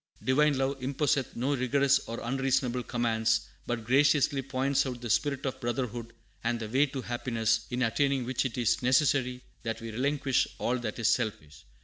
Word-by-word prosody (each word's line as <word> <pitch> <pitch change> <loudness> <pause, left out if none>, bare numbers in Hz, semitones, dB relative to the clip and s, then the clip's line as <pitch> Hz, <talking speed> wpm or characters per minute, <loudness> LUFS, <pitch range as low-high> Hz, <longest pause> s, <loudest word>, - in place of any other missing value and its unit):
Divine 145 +2 +3
Love 135 0 -1
imposeth 135 0 0
no 135 +4 0
rigorous 140 +2 +3
or 115 - -5
unreasonable 130 0 0
commands, 110 -2 +1 0.3
but 120 -2 -2
graciously 140 +2 +3
points 135 +1 0
out 125 -2 -5
the 120 -2 -3
spirit 140 +2 0
of 130 - -3
brotherhood 120 -1 -3 0.3
and 120 0 0
the 110 - -4
way 135 +6 +3
to 135 -2 -5
happiness, 115 -2 -1
in 125 0 -1
attaining 135 +2 +1
which 130 +2 0
it 130 -2 -4
is 120 -3 +1
necessary 125 -1 +2 0.2
that 115 0 -3
we 115 -1 -6
relinquish 135 +3 +1
all 125 +1 0
that 110 -3 -4
is 115 -2 +1
selfish. 80 -11 -4
125 Hz, 170 wpm, -29 LUFS, 115-135 Hz, 0.3 s, Divine